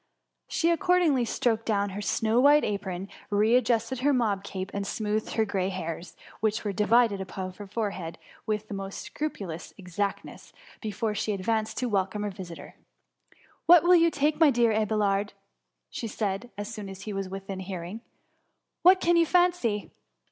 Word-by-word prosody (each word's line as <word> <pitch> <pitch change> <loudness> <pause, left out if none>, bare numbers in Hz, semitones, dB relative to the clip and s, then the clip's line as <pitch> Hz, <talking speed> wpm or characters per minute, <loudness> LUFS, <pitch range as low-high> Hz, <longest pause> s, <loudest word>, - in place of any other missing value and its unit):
She 335 0 +1
accordingly 340 -7 +3
stroked 225 0 0
down 205 -2 +1
her 200 +2 -5
snow 220 +3 +1
white 290 +3 +6
apron, 195 -2 -3 0.2
re 215 +3 +3
adjusted 250 +1 +1
her 285 +3 +3
mob 215 -6 +1
cap, 190 -1 -5
and 200 0 -3
smoothed 215 0 -2
her 220 - +2
grey 195 -2 -1
hairs, 165 -2 -6 0.2
which 215 0 0
were 205 - -1
di 210 +2 0
vided 230 -4 +4
upon 185 0 -5
her 205 +2 -10
forehead, 195 -6 -4 0.3
with 215 0 -1
the - - -7
most 195 0 -6
scrupu 300 -9 -3
lous 165 -1 -8
exactness, 195 +1 -4 0.3
before 215 0 -2
she 210 0 -1
advanced 215 +3 -1
to 255 - 0
welcome 205 0 0
her 205 - -2
visitors. 185 -3 -9 0.9
What 345 -2 +8
will 355 +1 +6
you 335 -1 +6
take, 300 0 0
my 320 -3 +7
dear 235 -3 +3
Mr. 215 0 +2
Abelard?*^ 205 -1 0 0.8
said 200 -2 -2
she, - - -17
as 205 +3 -5
soon 210 -3 -6
as 195 0 -9
he 210 - -5
was 195 -1 -3
within 195 0 -6
hearing; 185 +2 -6
^^ - - -30 0.8
what 370 +1 +7
can 345 0 +4
you 335 -1 +4
fancy 350 - +2
210 Hz, 175 wpm, -27 LUFS, 195-240 Hz, 0.9 s, What